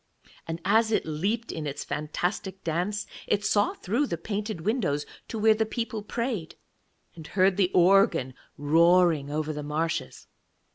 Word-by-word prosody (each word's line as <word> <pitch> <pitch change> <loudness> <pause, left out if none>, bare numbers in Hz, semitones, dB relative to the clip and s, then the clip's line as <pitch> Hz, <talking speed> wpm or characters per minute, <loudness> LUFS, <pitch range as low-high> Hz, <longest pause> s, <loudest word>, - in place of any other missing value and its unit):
And 165 0 -4
as 220 +3 +3
it 215 - +1
leaped 200 +10 -2
in 155 -2 -4
its 140 - -4
fantastic 180 +5 -3
dance, 180 +6 -1 0.2
it 205 0 +1
saw 205 0 +2
through 240 +10 -1
the 170 - -3
painted 205 +1 -4
windows 185 - 0 0.2
to 225 - -5
where 220 +1 +5
the 220 +1 +1
people 225 -1 -4
prayed, 225 -5 -3 0.6
and 160 -2 -10
heard 190 0 +3
the 190 -2 +2
organ 185 - +4 0.2
roaring 165 0 +4
over 155 +1 -2
the 150 - -5
marshes. 155 +2 -3
185 Hz, 150 wpm, -27 LUFS, 160-215 Hz, 0.6 s, where